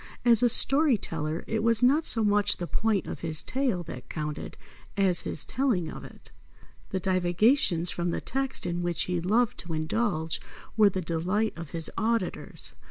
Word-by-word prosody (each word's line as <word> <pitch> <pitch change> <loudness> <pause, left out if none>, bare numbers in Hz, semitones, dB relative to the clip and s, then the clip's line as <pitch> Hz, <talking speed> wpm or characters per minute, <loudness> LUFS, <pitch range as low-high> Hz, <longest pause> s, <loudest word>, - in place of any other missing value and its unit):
As 235 -2 +8
a 245 - +4
story 275 +1 +5
teller, 160 -3 -4
it 220 -1 -2
was 230 +1 +2
not 290 +6 +4
so 225 - +3
much 205 -1 +2
the 175 - -4
point 210 +1 -1
of - - -6
his 160 -2 -3
tale 255 -10 -1
that 125 -5 -10
counted 150 -1 -5 0.4
as 190 -3 +3
his 150 - -4
telling 225 -11 -1
of - - -9
it. - - -14 0.6
The 190 - -2
divagations 185 - +2
from 175 0 -2
the - - -2
text 270 -2 -3
in 175 0 -2
which 175 -1 -1
he 180 -1 -2
loved 220 +6 +1
to 170 -2 -4
indulge 160 0 -2 0.3
were 215 -2 +5
the 185 -1 -4
delight 185 +7 -1
of 165 -3 -8
his 165 0 -5
auditors. 230 +1 -1
185 Hz, 175 wpm, -27 LUFS, 170-230 Hz, 0.6 s, As